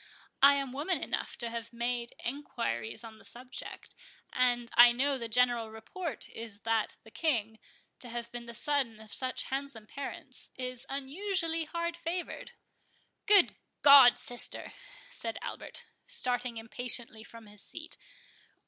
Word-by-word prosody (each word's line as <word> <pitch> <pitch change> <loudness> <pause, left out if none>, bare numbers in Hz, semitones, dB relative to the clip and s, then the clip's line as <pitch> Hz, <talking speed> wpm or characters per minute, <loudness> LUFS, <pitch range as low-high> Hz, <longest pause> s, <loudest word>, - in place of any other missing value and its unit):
I 280 +1 +9
am 275 -2 -2
woman 300 +7 0
enough - - -3
to 235 -2 -2
have 230 0 -5
made 235 0 -2
enquiries 235 - -3
on 220 -1 -11
the - - -17
subject, 250 +1 -7 0.4
and 245 -1 +2
I 240 0 +9
know 275 +4 +2
the 230 - -4
general 240 -1 +2
report 240 - -5
is, 220 -2 -6
that 225 -1 0
the 220 - -15
King, 225 -9 0 0.4
to 245 - -3
have 235 0 -5
been 240 -1 -7
the 235 - -4
son 275 -7 +2
of 215 -1 -11
such 255 -1 +1
handsome 270 -5 -4
parents, 270 +1 -7
is 255 0 -6
unusually 330 +4 -1
hard 340 +1 -3
favoured." 340 +1 -5 0.7
"Good 405 -3 +7 0.3
God, 280 -4 +10
sister!" 245 0 -2 0.4
said - - -4
Albert, - - -7 0.2
starting 245 -1 0
impatiently 230 -1 -2
from 230 0 -13
his 205 -1 -13
seat. - - -8
245 Hz, 140 wpm, -31 LUFS, 230-280 Hz, 0.7 s, God